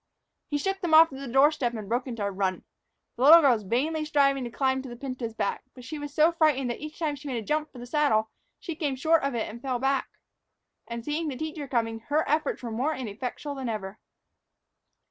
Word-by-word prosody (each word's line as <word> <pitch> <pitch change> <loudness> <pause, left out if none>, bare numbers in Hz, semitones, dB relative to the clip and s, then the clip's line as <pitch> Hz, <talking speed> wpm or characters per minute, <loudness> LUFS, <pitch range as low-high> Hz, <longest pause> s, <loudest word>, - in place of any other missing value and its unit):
He 290 - -1
shook 385 +6 -2
them 335 -3 +3
off 320 -2 +7
at 265 - -7
the 275 - -6
door 270 +5 +5
step 265 -6 -2
and 215 -3 -6
broke 245 +5 -1
into 230 -4 -4
a 200 - -1
run. 190 -1 -1 0.5
The - - -6
little 320 +5 +10
girl 275 -4 +5
was 220 - -2
vainly 280 +10 -1
striving 275 -3 +2
to 240 - -4
climb 265 +2 0
to 265 - -9
the 240 - -7
pinto's 255 -3 -5
back; 200 - -1
but 250 - -11
she 295 +4 -6
was 290 0 -6
so 310 +3 +4
frightened 300 -7 +2
that - - -6
each 305 +1 -8
time 305 -3 -1
she 285 +1 -10
made 255 -3 -2
a 220 - -5
jump 305 +3 -1
for - - -13
the 245 - -8
saddle 245 -5 +1 0.3
she 335 - -5
came 295 -4 -1
short 320 +5 +3
of 275 -2 -1
it 225 - -1
and 230 +2 -9
fell 255 -2 -1
back. 270 +1 0 0.8
And, 235 -1 -6
seeing 310 +2 -2
the 270 -4 -4
teacher 310 0 -5
coming, 225 -3 -1
her 300 +2 +1
efforts 305 -3 0
were 235 - -4
more 265 +8 -1
ineffectual 250 +4 -5
than 265 -3 -4
ever. 210 -1 -5
270 Hz, 240 wpm, -27 LUFS, 235-300 Hz, 0.8 s, little